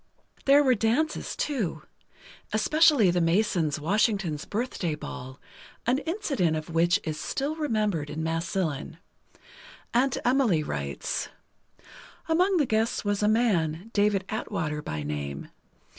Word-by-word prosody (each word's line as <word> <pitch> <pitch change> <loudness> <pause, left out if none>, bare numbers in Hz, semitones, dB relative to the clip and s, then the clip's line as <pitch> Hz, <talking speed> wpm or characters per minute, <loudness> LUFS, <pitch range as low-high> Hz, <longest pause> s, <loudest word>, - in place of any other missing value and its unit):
There 280 +1 +6
were 260 -2 +4
dances, 245 +8 0
too. 205 - -2 0.7
Especially 280 - +4
the 175 0 +1
Masons' 165 -3 +1
Washington's 190 -2 0
Birthday 205 -8 -2
Ball, 130 -3 -8 0.5
an 250 +3 +2
incident 290 - 0
of 155 +2 -6
which 170 +1 +3
is 155 -1 -4
still 285 - -2
remembered 215 - -1
in 160 +1 -4
Massillon. 165 -2 -2 1.0
Aunt 255 +2 +2
Emily 245 - +3
writes: 70 - -3 1.0
Among 360 +4 +3
the 300 - +3
guests 220 -1 0
was 205 0 0
a 210 - +3
man, 205 -4 +1
David 205 -2 +2
Atwater 165 -9 -3
by 75 - -4
name. 70 -1 -5
200 Hz, 120 wpm, -27 LUFS, 160-245 Hz, 1.0 s, There